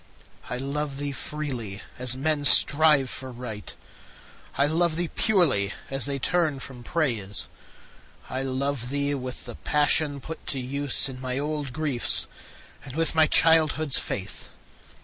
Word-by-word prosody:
I 125 - -2
love 140 +1 -3
thee 145 0 -3
freely, 130 -9 -6 0.2
as 125 0 +2
men 150 +1 0
strive 145 -1 +5
for 130 0 -8
Right; 120 -4 -6 0.8
I 140 - +3
love 160 +2 +1
thee 170 0 -2
purely, 150 - +3 0.2
as 135 0 0
they 140 -1 -2
turn 155 0 0
from 130 -2 -10
Praise. 110 - -1 0.8
I 130 - -4
love 135 -1 -3
thee 140 +1 -1
with 130 -2 -6
the 120 - -7
passion 150 +2 +1
put 160 +5 -9
to 135 - -2
use 140 +2 0
In 130 -1 -9
my 130 0 -3
old 145 -1 -3
griefs, 140 -3 +2 0.6
and 135 - -9
with 165 0 0
my 160 -1 +5
childhood's 155 -3 +4
faith. 95 -1 -6
140 Hz, 145 wpm, -25 LUFS, 125-155 Hz, 0.8 s, strive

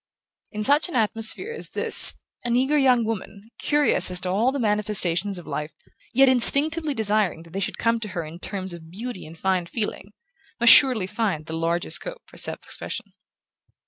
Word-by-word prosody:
In 215 0 -5
such 290 - +3
an 340 - -7
atmosphere 225 - 0
as 465 - -8
his - - +4 0.3
an 240 -1 -1
eager 265 +4 +1
young 255 -5 +2
woman, 220 0 -7
curious 290 -12 +4
as 180 0 +1
to 185 - -3
all 220 +8 +1
the 280 - -4
manifestations 205 -4 +1
of 175 - -11
life, 150 +1 -6 0.4
yet 270 +2 +4
instinctively 290 +4 +4
desiring 205 -7 0
that 165 - -18
they 195 - -5
should 195 - -4
come 230 0 0
to 220 - -4
her 175 -4 -5
in 160 +3 -11
terms 190 -1 -5
of 160 -2 -12
beauty 215 +2 -8
and 165 +1 -13
fine 185 -1 -1
feeling, 210 0 -5 0.5
must 235 0 +8
surely 255 -9 +5
find 190 -6 -3
the 160 - -8
largest 165 +2 -2
scope - - -10
for - - -18
self - - -4
expression. - - -7
215 Hz, 185 wpm, -23 LUFS, 180-255 Hz, 0.5 s, must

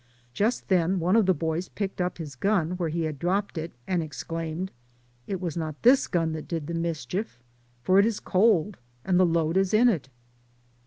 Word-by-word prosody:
Just 215 - 0
then 185 0 +2
one 180 +4 +2
of 220 -4 +4
the 185 - +5
boys 160 +3 -2
picked 195 -3 -4
up 180 0 -2
his 150 -5 -7
gun 185 +1 +1
where 180 -2 -2
he 165 +1 -1
had 155 -3 -3
dropped 195 +4 -1
it 165 +1 -4
and 180 -2 0
exclaimed, 165 +3 -4 0.6
"It 195 -2 -3
was 175 -4 -3
not 155 -3 -5
this 255 +3 +5
gun 165 -3 0
that 155 -1 -6
did 165 -3 -3
the 170 - -5
mischief, 165 - -3 0.5
for 185 +6 +4
it 200 - +5
is 225 -3 -2
cold, 200 -1 +2 0.3
and 185 -1 +3
the 185 - +5
load 165 +1 +1
is 195 +1 +2
in 240 +3 +6
it." 155 - -2
175 Hz, 200 wpm, -26 LUFS, 160-195 Hz, 0.6 s, in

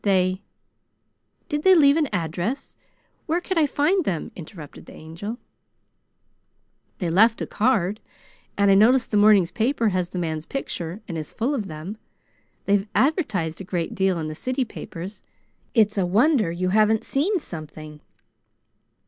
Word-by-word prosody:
They 185 -1 +2 0.5
" - - -48
"Did 295 0 -2
they 375 +3 +6
leave 285 -4 +6
an 310 -4 +1
address? 180 - -3 0.5
Where 330 +2 +1
could 360 -1 -1
I 305 - +3
find 310 +7 +1
them?" 175 - -3
interrupted 160 -3 -11
the - - -12
Angel. 170 +9 -7 1.6
"They 175 -4 -2
left 225 +6 +4
a - - -2
card, 215 -4 0 0.6
and 200 -1 +4
I - - +7
notice 235 +6 +5
the - - -4
morning 205 -3 +6
paper 225 +6 0
has 180 -2 -1
the 185 - -7
man's 160 -2 -3
picture 180 -8 -5
and 170 -5 -4
is 155 - -7
full 250 +6 -1
of 220 -8 -3
them. 160 +6 -7 0.7
They've 200 +1 +2
advertised 215 - 0
a - - -5
great 175 -2 -3
deal 190 -2 +1
in 160 -2 -3
the 155 - -5
city 255 - -2
papers. 190 -2 -8 0.5
It's 215 -2 +3
a 185 - +2
wonder 220 - +3
you 180 +2 -1
haven't 215 +2 +3
seen 360 +9 +1
something." 155 - -9
200 Hz, 155 wpm, -23 LUFS, 175-255 Hz, 1.6 s, I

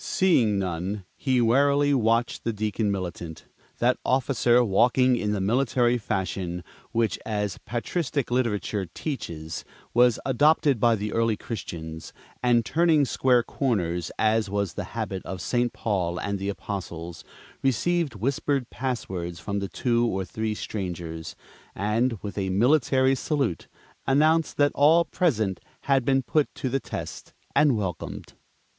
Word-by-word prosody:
Seeing 125 - +3
none, 95 +1 -3
he 130 -3 +1
warily 140 +4 +3
watched 115 -2 +1
the 115 - 0
Deacon 105 0 -1
Militant. 85 -4 -5 0.3
That 125 +1 +2
officer, 125 -2 +3
walking 125 +4 +3
in 105 -3 -1
the 105 - -1
military 120 +3 +2
fashion 95 -4 -3 0.3
which, 115 -1 0
as 105 -3 -2
patristic 135 - -2
literature 105 -5 0
teaches, 80 - -5 0.3
was 120 -1 +4
adopted 145 0 +3
by 115 +1 +4
the 105 0 -4
early 115 -2 +1
Christians, 80 -8 -7 0.3
and 120 -2 +3
turning 160 -1 +3
square 125 -2 +3
corners, 90 - -1
as 110 -1 +2
was 100 -4 -1
the - - -4
habit 95 -1 -3
of 95 - -6
St. 120 +2 0
Paul 90 -6 -1
and 100 -1 -2
the 100 +1 -2
Apostles, 85 -4 -6 0.4
received 150 +2 +1
whispered 135 +3 -1
passwords 95 -10 -4
from 100 +5 -3
the 100 -1 -4
two 120 +5 +1
or 95 -3 -2
three 110 +2 -3
strangers, 85 -6 -5 0.4
and, 115 +4 0
with 100 0 -4
a 95 -1 -1
military 130 +5 +3
salute, 135 - -1 0.4
announced 155 +4 +3
that 145 0 +4
all 160 +4 +5
present 110 - 0 0.2
had 135 -2 +2
been 135 +1 +2
put 150 +4 +1
to 130 - -2
the 135 +2 0
test - - -7 0.2
and 145 -6 +4
welcomed. 95 -5 -5
115 Hz, 140 wpm, -26 LUFS, 95-130 Hz, 0.4 s, all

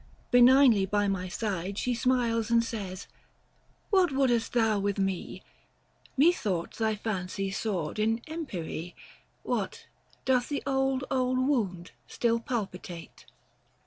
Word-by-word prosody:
Benignly 245 -4 +6
by 205 +1 +1
my 190 -2 -1
side 195 -1 -3
She 250 - 0
smiles 235 -2 +1
and 230 0 +4
says, 200 -5 -5 0.4
" - - -38
What 375 -5 +4
wouldest 255 -4 +1
thou 225 -3 +2
with 200 0 -1
me? 195 -2 -2 0.7
Methought 230 - +2
thy 220 -1 +1
fancy 195 -2 -3
soared 195 -4 -2
in 225 +2 +1
empyrie; 180 - -5 0.5
What, - - -3 0.4
doth 250 -2 +2
the 285 - -2
old, 270 -1 +1
old 255 -1 +1
wound, 220 -10 0 0.2
still 230 -1 +1
palpitate 190 -7 -6
225 Hz, 120 wpm, -29 LUFS, 195-255 Hz, 0.7 s, Benignly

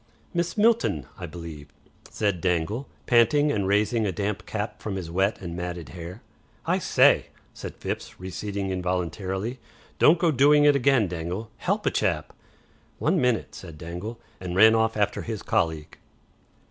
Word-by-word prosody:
"Miss 175 +2 -1
Milton, 210 - +3
I 90 - -5
believe," 80 -3 -9 0.4
said 100 -5 -1
Dangle, 95 +8 -1 0.2
panting 145 +5 +4
and 100 -5 0
raising 105 +2 +2
a - - 0
damp 105 +3 -3
cap 105 -1 -4
from 105 -3 -4
his 90 -4 -5
wet 95 +4 +1
and 85 -2 -6
matted 85 -4 -5
hair. 85 - -9 0.4
"I - - +1
SAY," - - +4 0.3
said - - -8
Phipps, - - -5
receding 95 +1 -4
involuntarily. 95 - -2 0.4
"Don't 160 +4 +6
go 170 -1 +2
doing 145 +2 +5
it 145 -1 +6
again, 135 -5 +3
Dangle. 90 +5 -5
HELP - - -1
a - - +3
chap." - - -1 0.6
"One 165 +2 +1
minute," 125 -3 +1
said 85 -4 -10
Dangle, 90 +9 -6 0.2
and 90 -1 -5
ran 110 +3 +7
after 110 -2 +1
his 110 -3 -5
colleague. 80 -9 -1
100 Hz, 150 wpm, -26 LUFS, 90-115 Hz, 0.6 s, ran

